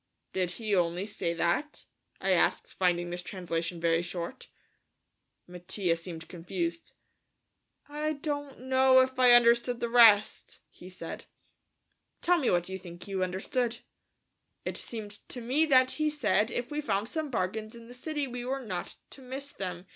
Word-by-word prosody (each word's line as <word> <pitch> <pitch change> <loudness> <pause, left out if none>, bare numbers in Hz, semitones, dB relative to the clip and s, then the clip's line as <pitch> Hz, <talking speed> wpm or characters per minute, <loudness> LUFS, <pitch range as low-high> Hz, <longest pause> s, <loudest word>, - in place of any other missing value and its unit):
"Did 180 -1 -1
he 215 -1 -3
only 175 +1 +1
say 175 -5 -2
that?" 175 - -1 0.3
I - - 0
asked, - - +2
finding 175 -1 +1
this 175 0 -4
translation 170 -2 -3
very 165 0 +2
short. 175 +7 -6 1.0
Mattia 180 0 -1
seemed 165 -1 -8
confused. 170 -1 -4 0.9
"I 300 +1 -2
don't 285 -2 -5
know 260 0 +5
if 260 0 -1
I 250 -1 +7
understood 240 0 +5
the 235 - -2
rest," 225 -3 +5
he 180 - -12
said. 180 -3 -8 0.9
"Tell 355 0 +3
me 265 - +1
what 175 -1 +1
you 190 0 -5
think 175 +1 -11
you 195 -1 -2
understood." 225 +6 -1 0.9
"It - - -3
seemed 215 -3 -5 0.2
to 250 - -5
me 265 +7 +1
that 260 -2 +5
he 305 -1 0
said 215 -8 +2
that - - -8
if 240 +3 -3
we 295 +1 -2
found 210 -7 -1
some 310 +2 -3
bargains 215 0 -2
in 230 0 -12
the 245 - -11
city 295 +3 -3
we 245 -2 -6
were 265 +1 -3
not 180 -4 -5 0.2
to 275 - -11
miss 270 +2 -6
them. 180 -2 -5
215 Hz, 160 wpm, -29 LUFS, 180-260 Hz, 1.0 s, I